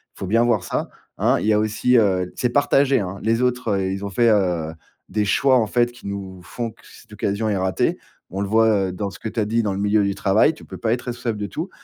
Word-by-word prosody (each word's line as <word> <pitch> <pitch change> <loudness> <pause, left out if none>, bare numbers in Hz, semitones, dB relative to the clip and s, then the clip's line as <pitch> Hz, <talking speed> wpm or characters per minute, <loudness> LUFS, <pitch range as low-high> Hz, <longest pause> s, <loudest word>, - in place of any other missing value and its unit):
faut 95 - -6
bien 115 +5 +3
voir 115 -6 +2
ça. - - -2 0.3
Hein. - - +2
Il - - -3
y 110 - +3
a 105 - +3
aussi, 110 +4 +1
heu, 95 -5 +1
c'est 125 - 0
partagé, 140 0 +3
hein. 95 -1 -4
Les 115 +2 +1
autres, 125 -2 0
heu, 95 -1 -1
ils 100 +1 -5
ont 100 - -3
fait, 115 +4 +3
heu, 90 -7 +1 0.3
des 105 - -1
choix 130 +6 +3
en 110 - +1
fait 120 +2 +1
qui 120 - -16
nous 95 -2 -6
font 115 +5 -5
que - - -23
cette - - -16
occasion 100 +2 -1
est 105 - +1
ratée. 95 0 0 0.3
On 95 +2 -4
le 100 - -1
voit, 110 -3 +3
heu, - - -4
dans 100 +2 -4
ce - - -12
que 110 - -4
tu 115 - -4
as 105 - +1
dit 115 +2 0
dans 105 - 0
le 95 - -4
milieu 105 +1 +2
du 100 -1 -1
travail, 100 +9 +3
tu - - -14
peux - - -9
pas 110 - -1
être 120 +1 -1
responsable 120 -2 -3
de 105 - -3
tout. 165 - -5
105 Hz, 275 wpm, -22 LUFS, 100-120 Hz, 0.3 s, bien